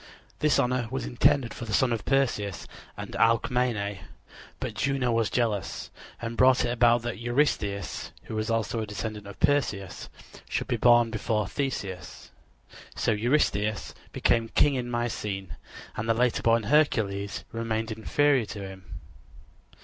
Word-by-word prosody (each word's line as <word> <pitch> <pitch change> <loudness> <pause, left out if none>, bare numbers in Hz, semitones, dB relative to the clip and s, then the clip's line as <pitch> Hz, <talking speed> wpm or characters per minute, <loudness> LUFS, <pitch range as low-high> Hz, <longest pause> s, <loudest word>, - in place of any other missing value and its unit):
This 150 -1 +3
honor 125 -1 +1
was 135 +2 -3
intended 120 0 +2
for 120 - -7
the 110 - -5
son 125 -2 +3
of 115 - -4
Perseus 110 - 0 0.3
and - - -6
Alcmene; 115 -3 +1 0.6
but - - -4
Juno 135 -2 0
was 115 -1 +1
jealous 110 -5 -1 0.3
and 115 0 -4
brought 130 +1 +5
it 120 - 0
about 120 -1 +4
that 120 -2 -4
Eurystheus, 120 -6 -1
who - - -8
was 110 +1 -2
also 115 0 0
a 110 - -3
descendant 105 0 -5
of 100 - -10
Perseus, 115 -10 0 0.4
should - - -2
be - - 0
born 120 -1 +5
before 110 -1 -1
Theseus. 95 -9 -4 0.6
So - - +1
Eurystheus 110 -2 +1 0.2
became 115 -1 +1
king 145 +4 +3
in 125 -2 -2
Mycene, 105 -5 -3 0.4
and 115 +2 -3
the 115 - +4
later 120 0 +2
born 115 0 +3
Hercules 105 -7 +1
remained 115 0 -2
inferior 130 +4 +2
to 105 - -7
him. 95 -1 -11
115 Hz, 145 wpm, -27 LUFS, 105-125 Hz, 0.6 s, brought